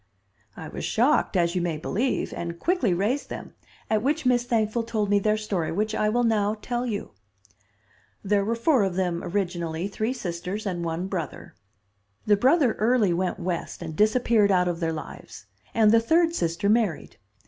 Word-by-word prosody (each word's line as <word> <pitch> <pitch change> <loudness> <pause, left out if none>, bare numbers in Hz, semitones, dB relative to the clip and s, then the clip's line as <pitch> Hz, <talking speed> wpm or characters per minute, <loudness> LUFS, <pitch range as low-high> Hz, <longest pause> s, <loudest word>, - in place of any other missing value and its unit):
"I - - -7
was - - -7
shocked, - - +2
as 170 -1 +2
you 180 - 0
may 170 -3 -1
believe, 230 - -1
and 170 0 -5
quickly 330 - +1
raised 210 +11 -1
them, - - -7 0.3
at 215 -1 +1
which 295 +4 0
Miss 245 -1 +3
Thankful 225 -1 0
told 220 -3 -2
me 205 - +4
their 215 +1 +1
story, 200 -6 -2
which 215 +5 -1
I 215 -1 +1
will 240 +3 +1
now 215 -2 +1
tell 245 +2 -3
you. 205 -3 -4 1.1
"There 200 0 +2
were 225 +3 -1
four 255 +2 +3
of 190 -2 -1
them 180 -2 -1
originally, 175 -2 -2
three 220 +4 -2
sisters 185 -1 -5
and 175 -3 -2
one 165 +2 -2
brother. 175 -7 -5 0.7
The 210 - +5
brother 260 - +3
early 220 -4 +3
went 180 +2 -1
West 175 -1 -4
and 160 -2 -6
disappeared 215 0 +3
out 180 -1 +3
of 175 -1 -2
their 165 -2 0
lives, 160 - -9 0.3
and 220 -2 +4
the 230 - +6
third 330 +7 +3
sister 170 - -1
married. 210 -6 0
205 Hz, 180 wpm, -25 LUFS, 175-230 Hz, 1.1 s, the